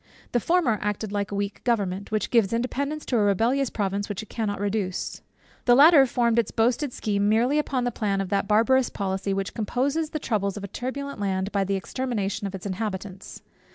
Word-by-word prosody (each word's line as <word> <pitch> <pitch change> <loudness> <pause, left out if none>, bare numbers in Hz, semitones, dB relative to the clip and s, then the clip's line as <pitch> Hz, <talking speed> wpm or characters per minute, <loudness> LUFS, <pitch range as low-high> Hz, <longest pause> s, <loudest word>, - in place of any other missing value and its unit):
The 240 - +2
former 285 - +2
acted 210 0 -2
like 205 0 -2
a - - -3
weak 200 0 -3
government, 200 -5 -1
which 215 -1 -1
gives 230 -4 +3
independence 280 +6 -2
to 245 - 0
a - - +3
rebellious 230 +7 +2
province, 200 0 -2
which 205 +1 -4
it - - -14
cannot 210 -4 -2
reduce. 200 -2 -2 0.4
The 245 - +6
latter 285 0 +8
formed 235 -1 +2
its 230 - 0
boasted 245 +5 +1
scheme 205 -3 0
merely 245 +7 +3
upon 265 -4 -1
the 245 - 0
plan 200 -3 -1
of 195 -2 -2
that 200 -1 0
barbarous 235 +5 +3
policy, 195 0 -2
which 195 0 -2
composes 275 +8 -1
the 310 - -3
troubles 205 -8 -1
of 200 - -7
a - - -4
turbulent 280 +5 -5
land 195 0 -1
by 200 -1 +1
the 195 +1 0
extermination 210 -1 -2
of 195 - -6
its 190 - -9
inhabitants. 195 -1 -5
215 Hz, 200 wpm, -25 LUFS, 200-250 Hz, 0.4 s, latter